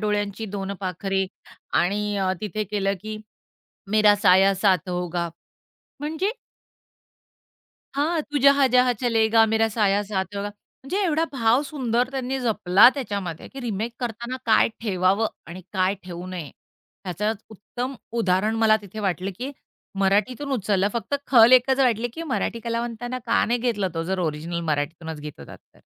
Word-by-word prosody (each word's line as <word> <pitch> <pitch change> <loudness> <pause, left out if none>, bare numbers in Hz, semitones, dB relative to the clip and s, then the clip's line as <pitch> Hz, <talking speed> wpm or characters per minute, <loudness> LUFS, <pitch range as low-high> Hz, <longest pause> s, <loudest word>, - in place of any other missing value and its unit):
डोळ्यांची 210 0 -1
दोन 195 0 -3
पाखरे 190 +1 -1 0.5
आणि 205 +3 0
अ, 190 -1 +1
तिथे 215 0 -3
केलं 200 -1 -1
की 215 0 -5 0.7
मेरा 210 -1 +5
साया 195 0 +5
साथ 185 -2 +2
होगा 175 -1 -2 0.7
म्हणजे 320 +8 -1 1.7
हां, 315 +3 +1
तू 295 0 -3
जहां 280 0 +6
जहां 250 0 +5
चलेगा, 225 -2 +4
मेरा 225 0 +3
साया 205 -2 +2
साथ 190 -1 -2
होगा. 200 +1 -2
म्हणजे 260 - -9
एवढा 320 0 +1
भाव 240 +1 +3
सुंदर 250 -4 -1
त्यांनी 265 0 -2
जपला 210 -4 +5
त्याच्यामध्ये, 200 - -4
की 270 - -9
रिमेक 230 -1 -3
करताना 240 +1 -4
काय 220 0 +5
ठेवावं 195 0 +1 0.2
आणि 180 +2 -9
काय 190 0 +1
ठेवू 175 0 -7
नये 175 -6 -6 0.5
ह्याचं 195 +4 -1 0.2
उत्तम 245 +5 -6 0.3
उदाहरण 195 +3 +1
मला 215 0 +6
तिथे 200 +2 -10
वाटलं, 190 -1 -1
की 260 +3 -4 0.5
मराठीतून 215 +8 +1
उचललं. 200 -4 +1
फक्त 235 +4 -2
खल 240 -1 +7
एकच 260 +1 +5
वाटले, 240 -3 +2
की 330 - -5
मराठी 230 - -1
कलावंताना 235 +1 -3
का 230 - +3
नाही 240 +2 0
घेतला, 225 -5 0
तो 165 - -1
जर 190 +2 -2
ओरिजिनल 165 +1 -2
मराठीतूनच 155 +2 -3
घेत 150 0 -9
होता - - -10
तर. - - -28
210 Hz, 150 wpm, -24 LUFS, 190-245 Hz, 1.7 s, खल